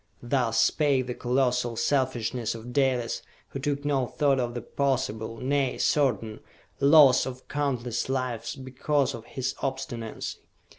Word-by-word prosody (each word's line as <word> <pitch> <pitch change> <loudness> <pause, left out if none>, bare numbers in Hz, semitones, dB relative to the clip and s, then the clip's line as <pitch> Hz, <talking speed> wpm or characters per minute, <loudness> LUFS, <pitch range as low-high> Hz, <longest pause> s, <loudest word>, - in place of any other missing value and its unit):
Thus 120 -3 +1
spake 135 +2 +3
the 125 - -3
colossal 125 -1 0
selfishness 120 -2 0
of 115 +2 -8
Dalis, 130 -4 +1 0.3
who 135 - -5
took 145 0 -2
no 135 -3 +1
thought 140 -1 +1
of 120 -1 -2
the 120 - -3
possible, 115 -5 -1
nay, 135 +1 0
certain, 115 -7 +1 0.4
loss 140 -3 +6
of 130 0 -8
countless 130 -5 -2
lives 125 -4 -2
because 135 +1 -1
of 115 -2 -8
his 130 -1 -3
obstinancy. 130 -4 -4
130 Hz, 135 wpm, -27 LUFS, 120-140 Hz, 0.4 s, loss